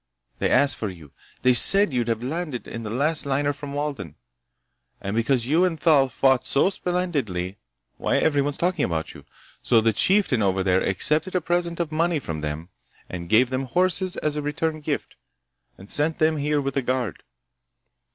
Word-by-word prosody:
They -, -, 0 dB
asked 135 Hz, -1 st, +3 dB
for 105 Hz, -, -3 dB
you. 80 Hz, -6 st, -13 dB, 0.3 s
They 125 Hz, 0 st, +5 dB
said 195 Hz, -, +6 dB
you'd 120 Hz, -2 st, 0 dB
have 115 Hz, 0 st, -2 dB
landed 150 Hz, -1 st, -4 dB
from 115 Hz, -, -7 dB
the 110 Hz, -, -6 dB
last 145 Hz, +7 st, +1 dB
liner 140 Hz, +1 st, 0 dB
from 145 Hz, 0 st, -8 dB
Walden. 145 Hz, -, -4 dB, 0.8 s
And 100 Hz, +2 st, -4 dB
because 115 Hz, +1 st, +1 dB
you 160 Hz, +7 st, +2 dB
and 170 Hz, -4 st, 0 dB
Thal 145 Hz, -5 st, +4 dB
fought 130 Hz, +1 st, +2 dB
so 140 Hz, +7 st, +2 dB
splendidly—why, 140 Hz, -, -3 dB
everybody's 145 Hz, -2 st, +1 dB
talking 180 Hz, -3 st, 0 dB
about 80 Hz, -2 st, -3 dB
you. -, -, -14 dB, 0.4 s
So 115 Hz, -, +3 dB
the 110 Hz, 0 st, +2 dB
chieftain 185 Hz, -, +2 dB
over 95 Hz, -1 st, +1 dB
there 95 Hz, 0 st, +2 dB
accepted 155 Hz, -, 0 dB
a -, -, +3 dB
present 175 Hz, 0 st, -1 dB
of 170 Hz, -2 st, -2 dB
money 165 Hz, +1 st, +1 dB
from 80 Hz, -, -5 dB
them, 75 Hz, +3 st, -5 dB, 0.4 s
and 85 Hz, -2 st, -7 dB
gave 120 Hz, +3 st, +4 dB
them 130 Hz, +1 st, -2 dB
horses 185 Hz, +5 st, +1 dB
as 150 Hz, -1 st, -2 dB
a 150 Hz, -, -2 dB
return 155 Hz, +2 st, -2 dB
gift, 145 Hz, -1 st, -4 dB, 0.6 s
and 95 Hz, -, -13 dB
sent 150 Hz, +7 st, +1 dB
them 155 Hz, 0 st, +2 dB
here 150 Hz, +1 st, 0 dB
with 135 Hz, -1 st, -3 dB
a -, -, +2 dB
guard. 125 Hz, -, -2 dB
140 Hz, 180 wpm, -23 LUFS, 115-160 Hz, 0.8 s, said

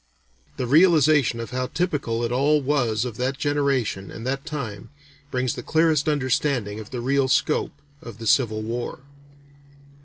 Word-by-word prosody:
The 130 Hz, -, -2 dB
realization 150 Hz, -4 st, +4 dB
of 115 Hz, -, -6 dB
how 130 Hz, 0 st, -2 dB
typical 145 Hz, -10 st, -1 dB
it 115 Hz, -, -1 dB
all 145 Hz, +4 st, +3 dB
was 130 Hz, -5 st, 0 dB
of 115 Hz, -3 st, -6 dB
that 130 Hz, +2 st, -1 dB
generation 140 Hz, -9 st, 0 dB
and 115 Hz, -, -8 dB
that 135 Hz, +3 st, -3 dB
time, 120 Hz, -11 st, -5 dB, 0.4 s
brings 125 Hz, -2 st, -1 dB
the -, -, -6 dB
clearest 160 Hz, -2 st, +2 dB
understanding 130 Hz, -6 st, 0 dB
of 110 Hz, -, -9 dB
the 125 Hz, -2 st, -5 dB
real 135 Hz, +2 st, +1 dB
scope 150 Hz, +3 st, +1 dB, 0.3 s
of 115 Hz, -3 st, -10 dB
the 115 Hz, -, -8 dB
Civil 110 Hz, -1 st, +2 dB
War. 120 Hz, +3 st, -4 dB
130 Hz, 155 wpm, -24 LUFS, 115-145 Hz, 0.4 s, realization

